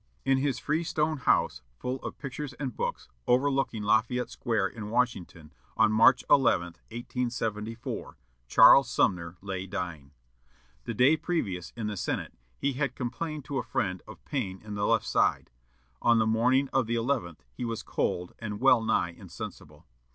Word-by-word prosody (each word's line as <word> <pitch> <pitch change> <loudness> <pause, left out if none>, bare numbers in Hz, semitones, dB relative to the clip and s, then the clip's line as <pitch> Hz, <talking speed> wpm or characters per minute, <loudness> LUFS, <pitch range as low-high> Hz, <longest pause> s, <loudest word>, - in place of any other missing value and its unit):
In 135 0 +3
his 140 -1 0
freestone 155 0 0
house, 125 - +2 0.2
full 125 - -3
of - - -6
pictures 140 0 -6
and 130 -1 -5
books, - - -3 0.2
overlooking 135 -3 +1
Lafayette 115 +4 +1
Square 110 -5 0
in 105 -3 -7
Washington, 105 -10 -2 0.2
on 110 -1 +5
March 115 +4 +5
11, 115 -10 +4 0.2
1874, 115 -2 -4 0.3
Charles 135 - +7
Sumner 90 -6 0
lay 95 -1 -4
dying. 90 -7 -5 0.8
The 115 - -4
day 130 +8 +5
previous, 100 - -2
in 115 - -3
the 105 0 -2
Senate, - - -3 0.2
he 140 0 0
had 135 -1 -2
complained 145 +4 -4
to 140 -2 -2
a - - -3
friend 95 -3 -2
of 110 - -13
pain 100 -10 -3
in 105 -1 -7
the 105 0 -1
left - - +2
side. - - +1 0.5
On 120 -1 +4
the 110 - +3
morning 125 +5 +3
of 130 -4 +2
the 120 - 0
eleventh 115 - -2
he - - -6
was 115 -2 -3
cold 90 0 -2
and 105 -2 -5
well 130 -2 +5
nigh 85 -5 +1
insensible. 85 - -10
115 Hz, 160 wpm, -28 LUFS, 105-135 Hz, 0.8 s, Charles